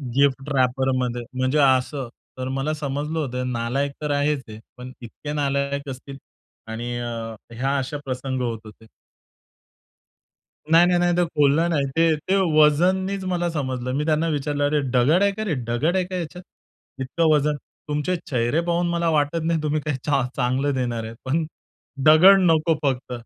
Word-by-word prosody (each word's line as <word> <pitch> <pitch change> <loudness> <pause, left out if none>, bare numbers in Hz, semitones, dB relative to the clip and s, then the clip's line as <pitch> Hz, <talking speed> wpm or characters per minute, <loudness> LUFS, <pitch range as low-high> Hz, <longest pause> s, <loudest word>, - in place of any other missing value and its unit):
Gift 140 0 +2
रॅपरमध्ये 130 -1 0 0.2
म्हणजे 130 +3 +1
असं. 130 -1 +2 0.3
तर 130 0 -4
मला 135 +3 -1
समजलं 150 +1 -3
होतं 125 -3 -3
नालायक 125 +4 -1
तर 150 -1 -2
आहेच 145 -1 0
हे 110 0 -9 0.2
पण 125 +1 -9
इतके 135 +5 -7
नालायक 140 -1 -1
असतील 135 +1 -8 0.5
आणि 115 +2 -5 0.7
ह्या 135 +2 +1
अशा 135 +2 -3
प्रसंग 130 0 -3
होत 115 -3 -2
होते. 110 +1 -14 1.8
नाही, 165 +2 +6
नाही, 180 -1 +2
नाही, 175 0 +2
ते 175 - +4
खोलला 150 +1 +2
नाही. 155 -5 +1
ते 165 -1 +4
ते 175 +6 -1 0.2
वजननीच 185 +6 +3
मला 175 -1 0
समजलं. 130 -5 -3
मी 150 - -1
त्यांना 155 +1 +1
विचारलं, 145 0 -1
"अरे 150 +1 +1
दगड 135 +8 +3
आहे 200 - +3
का 215 +2 -5
रे 195 -7 -1 0.2
दगड 150 +10 +1
आहे 185 -1 +1
का 185 +1 -6
याच्यात? 180 +1 -5 0.6
इतकं 160 +5 +1
वजन, 150 0 +2 0.3
तुमचे 150 +4 -1
चेहरे 125 +5 +1
पाहून 175 0 +1
मला 170 -1 0
वाटत 155 +1 +1
नाही 165 -1 0
तुम्ही 150 0 0
काही 150 -3 -2
चा 140 -2 +2
चांगलं 135 +2 0
देणार 120 -3 -2
आहेत, 110 +1 -8
पण 155 +5 0 0.6
दगड 185 +6 +8
नको 160 +1 +2
फक्त." 130 -3 -1
145 Hz, 165 wpm, -23 LUFS, 130-160 Hz, 1.8 s, दगड